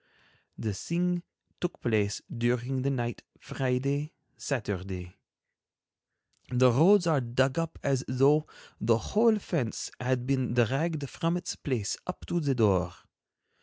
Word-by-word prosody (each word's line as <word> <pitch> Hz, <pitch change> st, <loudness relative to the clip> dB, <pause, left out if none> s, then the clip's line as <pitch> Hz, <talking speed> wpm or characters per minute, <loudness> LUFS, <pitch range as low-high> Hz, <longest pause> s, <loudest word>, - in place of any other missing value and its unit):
The 110 Hz, -2 st, -2 dB
thing 175 Hz, -, -1 dB, 0.4 s
took 175 Hz, -, -3 dB
place 105 Hz, -3 st, 0 dB
during 125 Hz, +2 st, 0 dB
the 135 Hz, -, +1 dB
night 120 Hz, -3 st, -2 dB, 0.2 s
Friday—Saturday. 125 Hz, -, -3 dB, 1.4 s
The 125 Hz, 0 st, +5 dB
roads 175 Hz, -, +6 dB
are 155 Hz, -5 st, +3 dB
dug 130 Hz, +4 st, +1 dB
up 165 Hz, -1 st, -3 dB
as 135 Hz, -2 st, +1 dB
though 140 Hz, +4 st, +3 dB, 0.3 s
the 115 Hz, 0 st, +3 dB
whole 220 Hz, -, +3 dB
fence 155 Hz, -, -3 dB
had 125 Hz, 0 st, 0 dB
been 130 Hz, -3 st, 0 dB
dragged 140 Hz, +5 st, +1 dB
from 165 Hz, +4 st, -1 dB
its 175 Hz, -, -4 dB
place 120 Hz, -, -2 dB
up 185 Hz, -, -6 dB
to 175 Hz, -, -1 dB
the 140 Hz, -4 st, +1 dB
door. 95 Hz, -6 st, +2 dB
130 Hz, 125 wpm, -29 LUFS, 120-155 Hz, 1.4 s, roads